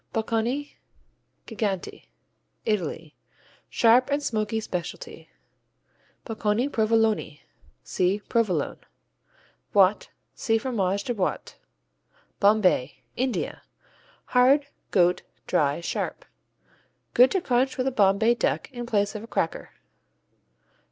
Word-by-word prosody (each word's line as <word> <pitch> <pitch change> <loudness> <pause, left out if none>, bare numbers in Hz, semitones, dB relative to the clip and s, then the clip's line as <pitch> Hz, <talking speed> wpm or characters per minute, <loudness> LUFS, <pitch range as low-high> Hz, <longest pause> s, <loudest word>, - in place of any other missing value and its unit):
Bocconi 230 +6 -2 0.7
Geganti 205 -5 -4 0.6
Italy 165 -6 -2 0.5
Sharp 245 +3 +4
and 290 +1 0
smoky 220 -3 -1
specialty. 440 - -6 1.0
Bocconi 225 +2 0
Provoloni 220 - +1 0.4
see 185 - 0
Provolone. 190 -10 0 1.0
Boîte 195 +1 +4 0.3
see 225 -1 0
Fromage 200 -5 -1
de 245 - -2
Boîte. 195 -5 -3 0.9
Bombay 195 -10 +2
India 255 0 -2 0.7
Hard; 265 +3 +5 0.2
goat; 180 -1 +3 0.2
dry; 145 0 +1
sharp. - - -4 0.9
Good 250 +2 +6
to 385 - +1
crunch 255 -3 0
with 255 - -1
a 265 - +1
Bombay 210 +1 +3
Duck 240 - -1
in 240 -2 -6
place 205 -3 +1
of 215 - -6
a 225 - -10
cracker. 165 -7 -2
220 Hz, 100 wpm, -25 LUFS, 195-245 Hz, 1.0 s, Good